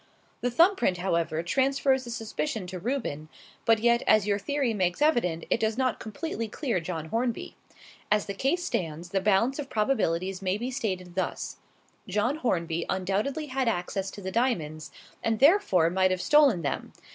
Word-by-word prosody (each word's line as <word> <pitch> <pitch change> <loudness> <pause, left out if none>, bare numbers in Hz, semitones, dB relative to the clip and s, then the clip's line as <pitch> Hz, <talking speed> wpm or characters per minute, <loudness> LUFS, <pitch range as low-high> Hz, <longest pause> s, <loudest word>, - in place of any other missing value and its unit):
The 245 - +1
thumb 340 +11 +5
print, 185 - +1
however, 170 -3 0
transfers 265 +5 +1
the - - -8
suspicion 225 -1 -3
to 180 0 -6
Reuben; 185 - -3 0.4
but 225 0 +5
yet, 235 +2 +3
as 215 -2 +5
your 205 -1 +1
theory 275 +1 0
makes 185 -4 0
evident, 235 - +2
it - - +3
does 220 0 0
not 260 -3 0
completely 230 +1 -4
clear 235 - -2
John 165 -2 -5
Hornby. 235 +3 -2 0.6
As 210 -1 +3
the 200 - -4
case 280 - 0
stands, 165 0 -3
the 195 +1 0
balance 215 +8 +2
of 280 -2 -5
probabilities 195 -5 0
may 190 +1 0
be 245 +4 -4
stated 185 -9 -3
thus: 185 - -3 0.5
John 210 +9 0
Hornby 170 - -1
undoubtedly 200 +11 -1
had 265 -2 -1
access 195 -1 -1
to 200 - -10
the 190 - -3
diamonds, 165 - -1 0.3
and 225 -1 +1
therefore 260 - +4
might 185 +1 +3
have 185 0 0
stolen 275 - +4
them. 140 - -3
210 Hz, 170 wpm, -27 LUFS, 180-255 Hz, 0.6 s, thumb